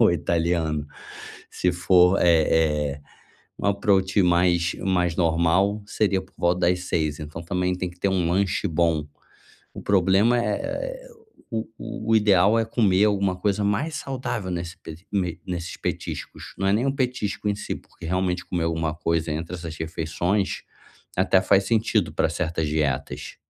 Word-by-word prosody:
ou 110 - +6
italiano. 80 -2 0 0.6
Se 90 - 0
for, 90 +1 +4
é 80 -3 +3
é - - -15 0.6
um - - -2
approach 100 -1 +2
mais 85 0 +2
mais 90 -3 +1
normal, 90 +5 +2
seria 100 -2 0
por - - -20
volta 90 +1 +1
das 90 0 +1
18h. 80 -4 -1
Então, 75 +2 -7
também 90 +1 -1
tem 90 -1 -3
que 90 - -18
ter 100 - +2
um 90 -3 +1
lanche 95 +1 +1
bom. 80 -2 +1 0.7
O - - -8
problema, 100 +5 +3
eh 105 -3 0
eh, - - -5 0.4
o 110 0 -2
o 110 0 -5
o - - +7
ideal 105 0 +4
é 115 - +2
comer 105 -4 +3
alguma 100 -2 +1
coisa 100 +2 0
mais 110 +11 0
saudável 125 -9 -4
nesse 85 -1 -4
pe 80 - -9 0.2
me 90 -4 -1
nesses 85 -2 -4
petiscos, - - -5
não 95 - 0
é - - +3
nem 115 +6 +1
um 135 - 0
petisco 120 -6 -1
em 105 - +1
si, - - -4
porque - - -15
realmente 90 0 -1
comer 85 -2 -1
alguma 80 -1 -1
coisa 85 -1 -1
entre 85 +3 -4
essas 85 -2 -7
refeições, 85 +5 -1 0.5
até 95 0 +4
faz 95 +1 +3
sentido 110 +1 +1
pra - - +2
certas 80 -2 -2
dietas. 75 -3 -2
90 Hz, 165 wpm, -24 LUFS, 85-100 Hz, 0.7 s, o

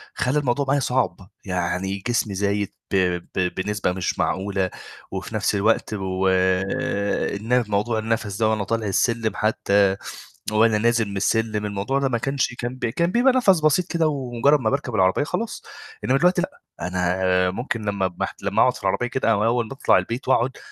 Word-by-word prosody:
خلّى 135 +4 +1
الموضوع 140 0 0
معايا 140 +1 +2
صعب، 110 -8 -1 0.2
يعني 90 +1 -2
جسمي 120 -3 0
زايد 100 0 -1 0.2
ب - - +3 0.4
ب 90 -1 0
بنسبة 105 0 -1
مش 90 -1 -3
معقولة، 95 -1 0 0.4
وفي - - -5
نَفْس - - +1
الوقت 110 +2 +1
و 95 -2 -1 1.1
الن 120 +4 +1
موضوع 105 +2 0
النَفَس 110 -2 -2
ده 110 0 +2
وأنا 110 -2 0
طالع 115 +1 -2
السلِّم 115 +3 +1
حتّى 100 -2 +2 0.5
وأنا 110 0 +4
نازل 115 0 +2
من 100 - -5
السلِّم 110 +1 0
الموضوع 105 +7 -1
ده 135 - +1
ما 120 - 0
كانش 135 0 -1
كان 120 +1 -4
ب 130 - -3
كان 170 +10 0
بيبقى 245 +5 +4
نَفَس 195 -10 +4
بسيط 155 +4 +3
كده 165 -2 +2
ومجرّد 140 0 +2
ما 110 -4 0
باركب 135 -3 -2
العربيّة 95 +5 +3
خلاص، 180 +9 -3 0.4
إنّما 130 - +3
دلوقتي 180 +2 +3
لأ، 185 - -6 0.2
أنا 90 0 +1
ممكن 120 +3 -3
لمّا 95 -3 -1
محت - - -4
لمّا - - +1
أقعُد - - +4
في - - -11
العربيّة 125 - 0
كده 120 -2 0
أو 105 -1 +2
أوّل 115 -1 +1
باطلع 135 - +3
البيت 120 +4 -3
وأقعُد 130 0 +2
110 Hz, 175 wpm, -23 LUFS, 100-130 Hz, 1.1 s, وأنا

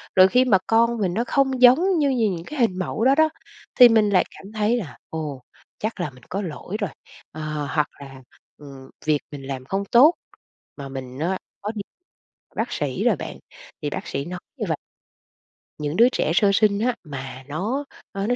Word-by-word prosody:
rồi 185 0 +8
khi 250 +4 +4
mà 205 -6 +5
con 235 +1 +3
mình 190 -5 0
nó 230 +5 0
không 265 -2 +1
giống 335 +10 +6
như 285 -2 +3
như 230 -5 +2
những 170 -3 -4
cái 300 -2 -7
hình 190 -6 +2
mẫu 215 +4 -2
đó 270 +1 +5
đó, 315 0 +4 0.5
thì 245 -1 +11
mình 215 -2 +4
lại 185 -2 +4
cảm 195 +2 -12
thấy 215 +3 +1
là, 150 - -6
ồ, 150 -4 -5 0.4
chắc 215 -2 -3
là 175 - -1
mình 125 -2 -18
có 195 - -2
lỗi 185 +3 -5
rồi, 200 - 0 0.4
ờ, 155 - -8 0.3
hoặc 150 -2 +1
là, 135 -1 -11 0.4
ừ, 145 - -14 0.4
việc 150 -1 +3
mình 140 -2 -8
làm 130 -2 -5
không 195 +5 -2
tốt. 265 - +6 0.6
Mà 140 -1 -7
mình 130 -1 -7
á, 180 +4 0 0.2
có 210 +2 -3
đi 205 - -3 0.7
bác - - -2
sĩ - - -2
rồi - - +4
bạn, - - -7 0.4
thì 145 - -2
bác - - -5
sĩ 140 +1 -3
nói 180 +1 -6 0.2
như - - -2
vầy - - 0 1.0
những 150 +1 -3
đứa 235 +3 +6
trẻ 160 - 0
sơ 200 0 +4
sinh 205 0 +3
á, 245 +1 +1
mà 135 -4 -7
nó, 215 - -2 0.3
ơ, 195 +1 -3
nó 245 - +2
195 Hz, 205 wpm, -23 LUFS, 150-235 Hz, 1.0 s, thì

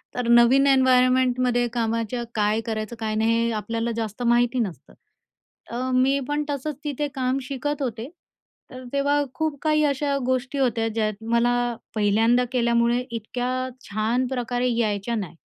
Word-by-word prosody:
तर 250 -1 -2
नवीन 240 +4 +5
एन्व्हायरमेंटमध्ये 255 -2 +3
कामाच्या 230 0 -1
काय 210 +1 +1
करायचं, 220 0 -4
काय 215 -1 -2
नाही 230 +1 +2
हे 235 - 0
आपल्याला 225 +2 -2
जास्त 225 +1 -4
माहिती 240 +1 +2
नसतं. 200 -8 -4 0.8
अ, 250 +2 -2
मी 265 +2 +3
पण 295 +1 0
तसंच 290 +1 -3
तिथे 295 0 -2
काम 260 0 0
शिकत 285 +2 -3
होते, 240 0 -4 0.6
तर 255 0 -9
तेव्हा 285 +1 +2
खूप 315 -2 -2
काही 305 -1 +2
अशा 280 0 0
गोष्टी 260 +2 -1
होत्या 230 -4 +1
ज्यात 215 -1 -2
मला 240 0 +2 0.2
पहिल्यांदा 220 +4 +3
केल्यामुळे 235 -1 +2
इतक्या 250 +3 -3 0.2
छान 220 +5 0
प्रकारे 245 -1 -1
यायच्या 215 0 -1
नाही. 195 -6 -5
245 Hz, 145 wpm, -24 LUFS, 225-260 Hz, 0.8 s, नवीन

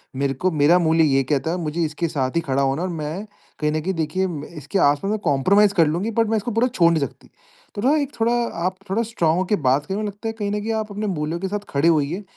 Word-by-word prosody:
मेरे 135 0 0
को 185 +8 0
मेरा 155 +2 +4
मूल्य 165 -1 +3
ये 135 -3 +3
कहता 145 +3 +1
है 180 - -1
मुझे 165 0 -3
इसके 155 +2 -2
साथ 135 -2 -2
ही 170 - +2
खड़ा 140 -3 0
होना 135 +4 0
है 185 - -1
और 175 - -4
मैं, 160 +6 -4 0.3
कहीं 150 -1 +1
न 155 0 -1
कहीं 190 +4 -2
देखिए 165 +3 -1 0.3
इसके 150 +7 -2
आसपास 145 +8 +2
में 215 - 0
कंप्रोमाइज 195 +9 +4
कर 165 -5 +4
लूँगी 180 +9 -1
बट 225 - +1
मैं 225 - +2
इसको 215 +4 -3
पूरा 230 +3 +2
छोड़ 175 -9 +3
नहीं 160 - 0
सकती। - - -21 0.5
तो 205 - -3
न 285 +6 +3
एक 285 0 -3
थोड़ा 230 +1 +2 0.3
आप 185 +1 0
थोड़ा 205 +4 +1
स्ट्रांग 175 -8 0
होके 185 +3 +1
बात 140 -2 +1
करे 190 - -3
मेर 215 - -2
को - - -1
लगता 205 +3 -8
है 225 - -2
कहीं 205 -1 -1
न 210 - -1
कहीं 225 +2 -3
आप 220 -1 -3
अपने 210 +1 -3
मूल्यों 160 -2 -2
के 190 - -2
साथ 205 +1 -4
खड़े 140 +4 +1
होइए, 165 +4 +1
170 Hz, 275 wpm, -22 LUFS, 150-205 Hz, 0.5 s, मेरा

